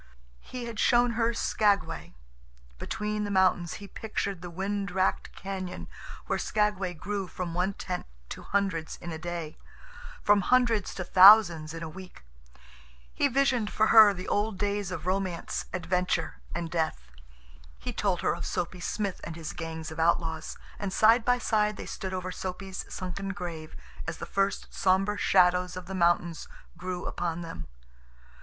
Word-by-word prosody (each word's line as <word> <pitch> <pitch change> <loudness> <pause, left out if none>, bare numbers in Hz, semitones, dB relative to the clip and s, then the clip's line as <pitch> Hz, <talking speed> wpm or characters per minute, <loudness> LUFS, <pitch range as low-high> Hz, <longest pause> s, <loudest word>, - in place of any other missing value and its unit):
He 250 - -7
had 230 -2 -6
shown 240 0 +4
her 230 0 +1
Skagway. 205 - 0 0.6
Between 210 0 -2
the 205 - -3
mountains 185 -3 +2
he 200 - -9
pictured 200 -4 -4
the 180 - -7
wind 195 +3 -2
racked 190 0 0
cañon 190 -2 -5 0.4
where - - -1
Skagway 205 -4 0
grew 195 +3 -3
from 175 -1 -5
one 180 +3 0
tent 180 - -5 0.2
to - - -7
hundreds 195 -5 -1
in 175 - -7
a 160 - -5
day, 170 -2 -5 0.6
from 205 -1 +5
hundreds 235 -2 +2
to 185 - -3
thousands 185 -4 +7
in 165 - -6
a - - -4
week; 185 - -11 0.9
he - - +2
visioned 255 -5 +2
for 220 - +2
her 220 -2 +10
the 185 -1 -6
old 210 -1 0
days 205 -1 -1
of 170 -3 -5
romance, 185 -2 -2
adventure, 180 - -1 0.2
and 165 -2 -3
death; 155 - -2 0.7
he - - -5
told - - 0
her - - +2
of - - -6
Soapy 180 +1 -3
Smith 200 +2 -3
and 165 - -6
his 160 -2 -6
gang 165 -1 -5
of 160 - -7
outlaws, 165 -1 0 0.2
and 200 -2 -3
side 225 +4 +5
by 245 +1 +3
side 210 -3 +1
they - - -6
stood 190 - -5
over 185 0 -3
Soapy's 190 +1 -6
sunken 195 +2 -4
grave 170 -5 -7 0.3
as - - -3
the - - -6
first 195 0 -1
somber 195 +2 +2
shadows 180 -2 +3
of 185 - -7
the 190 - -7
mountains 170 -2 +1 0.3
grew 180 0 -5
upon 175 -1 -3
them. 80 - -7
185 Hz, 160 wpm, -28 LUFS, 175-205 Hz, 0.9 s, her